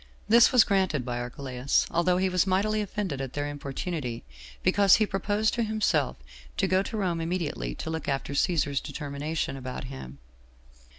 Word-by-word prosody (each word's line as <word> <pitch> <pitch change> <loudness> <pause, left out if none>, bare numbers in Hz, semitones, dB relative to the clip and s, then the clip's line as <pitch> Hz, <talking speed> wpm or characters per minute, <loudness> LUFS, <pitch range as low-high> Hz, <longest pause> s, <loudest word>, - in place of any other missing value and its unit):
This 235 +2 +7
was 250 -3 +7
granted 185 - +1
by 120 -1 -3
Archelaus, 125 +2 -1
although 180 +1 +2
he 190 +1 +2
was 185 0 +1
mightily 210 +3 +1
offended 190 -8 -3
at 135 -2 -5
their 145 0 -2
importunity, 145 -2 -4 0.4
because 200 -2 +5
he 215 - +3
proposed 205 +2 0
to 240 - 0
himself 210 - 0 0.4
to - - +2
go 185 0 +3
to 220 +3 -5
Rome 175 -5 -1
immediately 165 - -2
to 160 - -5
look 160 -2 -4
after 135 +1 -2
Cæsar's 145 -3 +1
determination 145 +1 -4
about 130 -1 -6
him. 130 - -8
160 Hz, 165 wpm, -27 LUFS, 135-195 Hz, 0.4 s, This